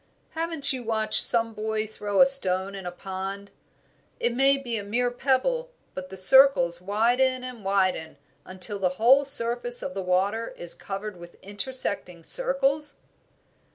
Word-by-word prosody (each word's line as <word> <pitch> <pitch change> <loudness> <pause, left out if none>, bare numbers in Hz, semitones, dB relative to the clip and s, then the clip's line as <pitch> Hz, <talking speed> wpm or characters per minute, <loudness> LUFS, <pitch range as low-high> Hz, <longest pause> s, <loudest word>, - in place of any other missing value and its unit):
"Haven't 325 -4 0
you 255 - -6
watched 220 -2 +2
some 230 -1 +5
boy 215 0 -3
throw 205 -1 -2
a - - +8
stone 195 -8 +3
in 190 -2 -8
a - - -5
pond? 195 +2 -8 0.7
It 240 - -1
may 270 +2 +3
be 245 -4 -5
a - - -8
mere 245 +4 -2
pebble, 290 - -1 0.2
but 185 0 -8
the 190 - -10
circles 185 -5 +5
widen 245 +6 0
and 250 -4 -9
widen 185 -6 -1 0.3
until 185 +2 -3
the 185 -1 -2
whole 265 +5 +4
surface 240 -2 +1
of 185 - -6
the 195 - -5
water 195 +5 -2
is 175 -1 -6
covered 195 0 -8
with 175 0 -14
intersecting 200 -5 -4
circles?" 280 - 0
220 Hz, 155 wpm, -24 LUFS, 190-260 Hz, 0.7 s, a